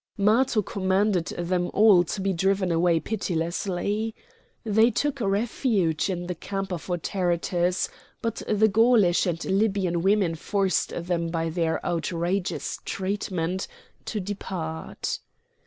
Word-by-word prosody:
Matho 215 +2 +3
commanded 190 -1 +1
them 175 +1 -1
all 205 -4 +7
to 195 - -4
be 195 0 +1
driven 190 +1 +1
away 170 0 +3
pitilessly. 195 +3 -2 0.5
They 220 +1 +4
took 275 +3 -1
refuge 200 - +1
in 175 -2 -2
the 180 - -3
camp 195 +2 -4
of 170 - -6
Autaritus; 175 0 0 0.3
but 230 -1 -3
the 215 0 +4
Gaulish 215 -4 +4
and 170 -1 -2
Libyan 190 -4 +1
women 195 -2 +3
forced 195 +4 0
them 170 -1 -2
by 165 0 -1
their 165 -1 -1
outrageous 175 +2 -2
treatment 190 -2 -2 0.4
to 215 - -3
depart. 180 -5 -4
190 Hz, 120 wpm, -26 LUFS, 175-205 Hz, 0.5 s, all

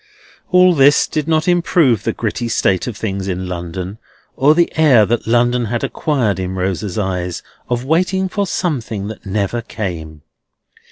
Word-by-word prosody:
All 180 0 +5
this 140 -2 +5
did 155 -1 -3
not 160 0 +1
improve 170 - +3
the - - +1
gritty 120 +1 -3
state 95 -3 +1
of 115 -4 -5
things 100 -3 -3
in 95 -1 -3
London, 90 +3 -5 0.4
or 145 +3 +4
the 170 0 +1
air 140 -9 +5
that 120 +2 -1
London 120 +1 +2
had 120 +2 -3
acquired 125 -11 0
in 95 0 -3
Rosa's 95 +1 -2
eyes 90 -3 -2 0.3
of 120 0 -1
waiting 185 +5 +1
for 200 +1 -2
something 115 - -2
that 110 - -10
never 100 +4 -1
came. 80 -9 -6
115 Hz, 160 wpm, -17 LUFS, 95-150 Hz, 0.4 s, All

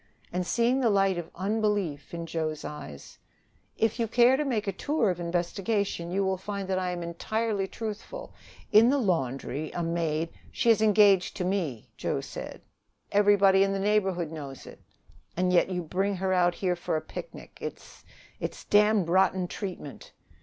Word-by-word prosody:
And, 180 0 -1
seeing 240 +3 +2
the 245 -3 +3
light 195 -3 +2
of 165 - -7
unbelief 200 -6 -1
in 170 -1 -5
Joe's 160 -2 -3
eyes: 110 - -9 0.6
"If 225 +1 +1
you 230 - +1
care 240 +3 +5
to 295 - 0
make 235 -7 -1
a 200 - 0
tour 230 +1 0
of 175 - -5
investigation, 175 +2 -1
you 195 +2 0
will 190 0 0
find 200 0 -4
that 185 -1 +1
I 185 -1 -1
am 175 -1 -3
entirely 200 +4 -2
truthful. 225 - -7 0.4
In 220 +2 +7
the 280 - +3
laundry 155 - -1
a 175 - -2
maid 165 -1 -1
" - - -23
"She 235 - +3
is 220 -1 +3
engaged 205 -3 +4
to 180 - -1
me" 175 - -2
doggedly. - - -4 0.5
"Everybody 200 -1 +5
in 195 0 +3
the - - -1
neighborhood 190 -5 +1
knows 140 -4 -8
it; - - -12 0.6
and 180 0 +2
yet 180 - +4
you 180 -1 -2
bring 190 +5 -1
her 190 0 0
out 175 -1 +3
here 180 -2 0
for 175 - -2
a - - -3
picnic! - - -9
It's - - -8 0.4
it's - - -5
damned 210 -3 +4
rotten 185 +1 +3
treatment." 180 -7 -7
190 Hz, 175 wpm, -28 LUFS, 170-210 Hz, 0.6 s, In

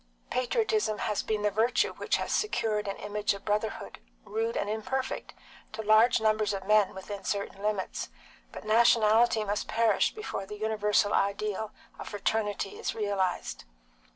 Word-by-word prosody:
Patriotism 425 - +1
has 215 -3 -1
been 215 -1 -2
the 210 - +2
virtue 225 +5 +2
which - - -1
has - - -3
secured 220 - 0
an 195 - -2
image 210 0 -1
of 200 - -12
brotherhood, 210 0 -2 0.3
rude 225 +2 -2
and 200 - -1
imperfect, 240 +5 -3 0.4
to 220 0 -5
large 220 +4 +5
numbers 215 -1 +1
of 190 -1 -5
men 210 -1 +3
within 195 +1 -7
certain 200 -1 -3
limits, 210 -2 -2 0.4
but - - -9
nationality 225 0 +4
must 205 0 -2
perish 225 -2 +2
before 430 - -5
the 210 - -7
universal 210 -1 +1
ideal 210 +1 0 0.3
of - - -7
fraternity 205 -1 -2
is - - -3
realised. 200 - -2
215 Hz, 150 wpm, -29 LUFS, 205-220 Hz, 0.4 s, large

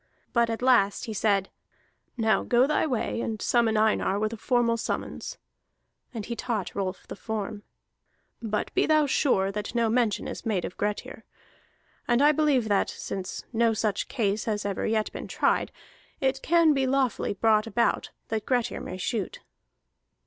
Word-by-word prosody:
But 235 -1 +3
at 225 +2 -3
last 240 -4 +3
he 225 - -5
said: 200 -2 +1 0.7
"Now 220 -2 +2
go 245 +1 +3
thy 300 +2 +1
way, 240 -3 -1
and 220 -2 -3
summon 230 -1 +2
Einar 215 -2 +2
with 215 +2 -1
a - - -3
formal 235 +1 +1
summons. - - -4 0.7
[And 225 -5 -5
he 235 - -4
taught 220 -4 -3
Rolf 190 -1 -3
the - - -7
form.] 215 -1 -4 0.8
But 215 -2 -2
be - - +2
thou 310 -1 +4
sure 195 -8 +2
that 210 +3 -5
no 230 -1 +2
mention 235 -3 +1
is - - -6
made 205 -6 -1
of - - -7
Grettir. 210 +1 -3 0.8
And 240 0 +3
I 295 +2 +6
believe 290 -6 +2
that, 200 -2 +2
since 190 -1 -5
no 230 0 +3
such 210 -2 -1
case 210 -4 -1
has 210 -2 -2
ever 200 -2 -1
yet 220 -1 0
been - - -7
tried, - - +1 0.5
it 270 0 0
can 335 -2 +4
lawfully 265 -5 +1
be - - -38
brought 220 0 +3
about 235 +2 +1 0.2
that 220 -1 -2
Grettir 245 -3 0
may 185 - -6
shoot." 210 +2 -3
225 Hz, 165 wpm, -27 LUFS, 210-250 Hz, 0.8 s, I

